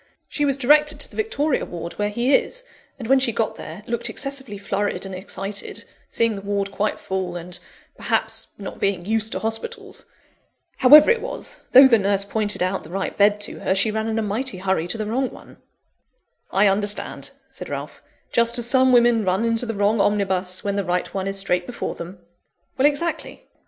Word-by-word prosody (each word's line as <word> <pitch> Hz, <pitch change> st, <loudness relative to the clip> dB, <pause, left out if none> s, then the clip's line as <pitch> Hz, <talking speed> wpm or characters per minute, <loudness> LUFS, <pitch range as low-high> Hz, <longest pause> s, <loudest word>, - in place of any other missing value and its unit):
She 295 Hz, -, -1 dB
was 275 Hz, -1 st, +1 dB
directed 300 Hz, +3 st, +3 dB
to -, -, +1 dB
the -, -, -14 dB
Victoria 315 Hz, -10 st, 0 dB
Ward, 170 Hz, 0 st, -7 dB
where 205 Hz, 0 st, 0 dB
he 240 Hz, +6 st, 0 dB
is; -, -, +1 dB, 0.3 s
and 235 Hz, -4 st, -7 dB
when 270 Hz, +2 st, +5 dB
she 260 Hz, -3 st, +1 dB
got 220 Hz, 0 st, -1 dB
there, 210 Hz, -, -9 dB
looked 235 Hz, 0 st, -2 dB
excessively 270 Hz, -6 st, -5 dB
flurried 200 Hz, 0 st, -2 dB
and 190 Hz, -, -7 dB
excited 195 Hz, +2 st, -5 dB, 0.2 s
seeing 230 Hz, -2 st, +1 dB
the 195 Hz, -, -7 dB
Ward 200 Hz, 0 st, -2 dB
quite 210 Hz, +2 st, -2 dB
full, 190 Hz, -2 st, -4 dB
and, 175 Hz, +1 st, -7 dB, 0.4 s
perhaps, -, -, 0 dB
not 195 Hz, -, -8 dB
being 190 Hz, -3 st, -1 dB
used 220 Hz, +1 st, 0 dB
to -, -, -2 dB
hospitals. 400 Hz, -, -5 dB, 0.7 s
However 295 Hz, -, +8 dB
it 470 Hz, -1 st, +1 dB
was, -, -, -6 dB
though 265 Hz, +1 st, +10 dB
the 230 Hz, -4 st, +4 dB
nurse 200 Hz, 0 st, +1 dB
pointed 210 Hz, -2 st, 0 dB
out 185 Hz, +1 st, -1 dB
the 155 Hz, -, -13 dB
right 195 Hz, +2 st, -3 dB
bed 205 Hz, 0 st, +3 dB
to 205 Hz, -, -2 dB
her, 190 Hz, -, 0 dB
she 205 Hz, +3 st, +2 dB
ran 220 Hz, +1 st, -2 dB
in 225 Hz, 0 st, -2 dB
a 225 Hz, -, 0 dB
mighty 220 Hz, +2 st, -2 dB
hurry 185 Hz, -3 st, -1 dB
to 225 Hz, -, -4 dB
the 215 Hz, -, -3 dB
wrong 250 Hz, +4 st, -1 dB
one." -, -, -15 dB, 0.9 s
"I 195 Hz, +2 st, +3 dB
understand," 205 Hz, +1 st, 0 dB, 0.2 s
said -, -, -9 dB
Ralph; -, -, -6 dB, 0.3 s
"just 235 Hz, 0 st, +3 dB
as 240 Hz, -, +2 dB
some 260 Hz, +1 st, +5 dB
women 240 Hz, -2 st, +4 dB
run 190 Hz, +4 st, 0 dB
into 230 Hz, +1 st, 0 dB
the 225 Hz, -, -3 dB
wrong 205 Hz, +1 st, +2 dB
omnibus, 190 Hz, -3 st, 0 dB
when 200 Hz, 0 st, -2 dB
the 200 Hz, -, 0 dB
right 180 Hz, 0 st, -2 dB
one 195 Hz, 0 st, -3 dB
is 195 Hz, 0 st, -2 dB
straight 180 Hz, -2 st, 0 dB
before 245 Hz, -, -4 dB
them." 175 Hz, +3 st, -9 dB, 0.6 s
"Exactly. 295 Hz, +5 st, 0 dB
210 Hz, 195 wpm, -22 LUFS, 195-250 Hz, 0.9 s, though